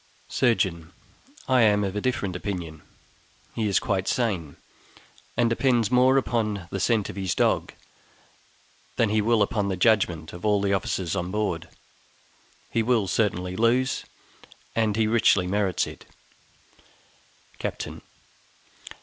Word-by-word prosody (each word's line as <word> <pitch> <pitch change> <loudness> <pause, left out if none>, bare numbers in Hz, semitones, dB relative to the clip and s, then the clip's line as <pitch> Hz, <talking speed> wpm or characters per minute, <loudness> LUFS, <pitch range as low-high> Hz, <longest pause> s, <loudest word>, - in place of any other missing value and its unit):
Surgeon. 95 -8 0 0.5
I 130 -2 +4
am 105 -2 +4
of 95 0 -3
a 105 - -1
different 100 -7 -1
opinion. 90 -5 -5 0.7
He 110 -2 -1
is 100 - +2
quite 95 -2 -1
sane, 95 - -1 0.8
and 120 0 +3
depends 120 -1 +1
more 130 +2 +5
upon 105 -8 -1
the 100 - -3
scent 110 0 +1
of - - -13
his 95 -2 -1
dog - - +1 1.2
than 115 - +2
he 110 0 +2
will 110 0 +3
upon 100 0 -1
the 95 - -2
judgment 90 -6 +2
of 85 - -10
all 105 -1 +3
the 100 0 0
officers 95 -2 -1
on 85 +1 -2
board; 95 -5 -2 1.0
he 115 - +1
will 110 -3 +1
certainly 90 -3 0
lose, 125 +4 +1 0.7
and 110 -2 +1
he 110 0 +2
richly 110 -4 +3
merits 95 -1 0
it. - - -11 1.5
Captain. - - -5
105 Hz, 130 wpm, -25 LUFS, 95-115 Hz, 1.5 s, more